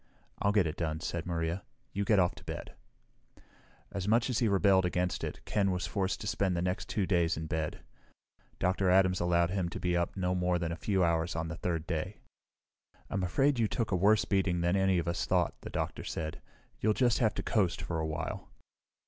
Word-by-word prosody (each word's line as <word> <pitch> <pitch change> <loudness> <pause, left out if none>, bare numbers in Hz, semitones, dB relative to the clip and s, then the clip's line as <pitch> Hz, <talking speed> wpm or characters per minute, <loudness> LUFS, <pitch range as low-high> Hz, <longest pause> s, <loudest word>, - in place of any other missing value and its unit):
"I'll 100 - +3
get 105 -3 +3
it 80 -1 -3
done," 80 -2 -2
said 85 +1 -4
Maria. 85 +1 -1 0.3
"You 100 +1 -1
get 105 - +4
off 90 -2 +3
to - - -14
bed." - - -6 1.2
As 100 -1 -3
much 115 +4 +3
as 115 - +1
he 120 - +2
rebelled 95 -1 +4
against 90 0 -1
it, - - -5
Ken 100 -2 +1
was 90 0 -1
forced 95 -1 -1
to - - -5
spend 95 -3 0
the - - 0
next 90 +2 -2
two 100 -3 0
days 85 -3 +2
in 80 - -4
bed. 80 -1 -3 0.8
Dr. 95 +1 +1
Adams 95 0 +4
allowed 85 0 +2
him 95 -3 -1
to - - -6
be 90 -1 0
up 85 +2 -1
no 90 -1 0
more 90 -1 +1
than 85 -1 -2
a - - -2
few 95 +3 +1
hours 85 0 +1
on 80 0 -2
the 85 - -4
third 85 -3 -2
day. 85 +4 -3 0.9
"I'm 95 - 0
afraid 135 +9 +2
you 110 - +3
took 115 0 -2
a - - +3
worse 105 +4 +4
beating 95 -3 +1
than 85 +2 +2
any 95 -1 +3
of 85 -1 -1
us 85 - -1
thought," 90 -2 +2
the - - -7
doctor - - -3
said. 80 -1 -4 0.4
"You'll 110 0 +2
just 120 -3 +3
have 110 -5 +2
to - - -3
coast 95 -6 +1
for 85 -1 -3
a 80 - -1
while." 80 0 -4
90 Hz, 215 wpm, -31 LUFS, 85-100 Hz, 1.2 s, get